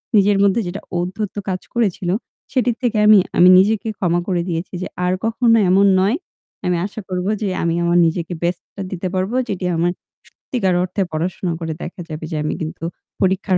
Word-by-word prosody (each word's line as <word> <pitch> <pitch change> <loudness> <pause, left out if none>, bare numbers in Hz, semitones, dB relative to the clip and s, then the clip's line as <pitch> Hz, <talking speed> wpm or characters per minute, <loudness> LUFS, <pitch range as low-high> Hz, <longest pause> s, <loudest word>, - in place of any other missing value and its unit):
নিজের 200 0 +5
মধ্যে 200 +3 +3
যেটা 185 +3 -5 0.2
ঔদ্ধত্য 185 +4 -3
কাজ 185 -1 -2
করেছিল, 200 -6 0 0.4
সেটির 245 -3 +1
থেকে 235 -3 +1
আমি 215 -1 +8 0.2
আমি 180 +1 +8
নিজেকে 215 +4 +3
ক্ষমা 175 -2 +1
করে 180 -3 +1
দিয়েছি 170 +3 -3
যে - - -3 0.2
আর 180 - +2
কখনো 230 0 +3
এমন 195 +2 +5
নয়। 200 +7 +2 0.5
আমি 180 -1 +1
আশা 210 +2 -6
করব 180 0 -2 0.2
যে 210 - 0 0.2
আমি 170 0 +1
আমার 170 0 +3
নিজেকে 170 +1 -1
best 175 0 0
টা 200 - -6
দিতে 185 0 -3
পারব 185 +3 -1 0.2
যেটি 185 -2 -2
আমার 170 +2 +2 0.4
সত্যিকার 195 -8 -2
অর্থে 185 +2 -2
পড়াশোনা 170 +2 -2
করে 160 -1 -3
দেখা 175 +1 -6
যাবে 155 +1 -6
যে - - -2
আমি 155 - -1
কিন্তু 160 +1 -5 0.4
পরীক্ষার 190 0 +2
185 Hz, 185 wpm, -20 LUFS, 175-205 Hz, 0.5 s, আমি